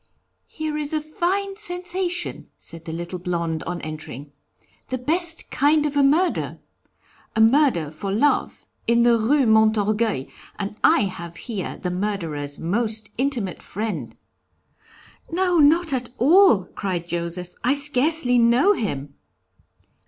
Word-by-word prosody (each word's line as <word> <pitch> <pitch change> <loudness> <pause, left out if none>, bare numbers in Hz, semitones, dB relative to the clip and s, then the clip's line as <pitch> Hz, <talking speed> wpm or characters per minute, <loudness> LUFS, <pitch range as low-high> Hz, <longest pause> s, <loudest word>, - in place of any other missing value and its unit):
'Here 310 -1 -4
is 300 +1 -2
a - - +1
fine 375 +6 -2
sensation,' 360 -2 -2
said 165 0 -8
the 160 - -5
little 170 +2 -5
blond 170 -3 -2
on 175 0 -4
entering. 150 -3 -8 0.6
'The 255 - -1
best 330 +6 0
kind 295 +2 +3
of 295 -1 -2
a 285 - +4
murder! 310 +7 +1 0.8
a - - 0
murder 225 - +3
for 195 +5 -5
love, 260 +9 +1 0.2
in 235 0 +4
the 240 -1 +5
Rue 255 +5 +2
Montorgueil, 215 - +2 0.3
and 205 +1 -4
I - - +5
have 175 -4 -5
here 205 0 -5
the 180 - -4
murderer's 165 -7 -3
most 215 +4 -1
intimate 250 -9 -1
friend.' 200 - -5 1.2
'No, 355 0 +2
not 315 +1 +4
at 250 -2 -2
all,' 300 - +5
cried 180 -3 -4
Joseph, 175 +1 -4
'I 250 +3 +3
scarcely 285 -2 +3
know 240 - +4
him.' 145 - -4
230 Hz, 130 wpm, -23 LUFS, 180-300 Hz, 1.2 s, the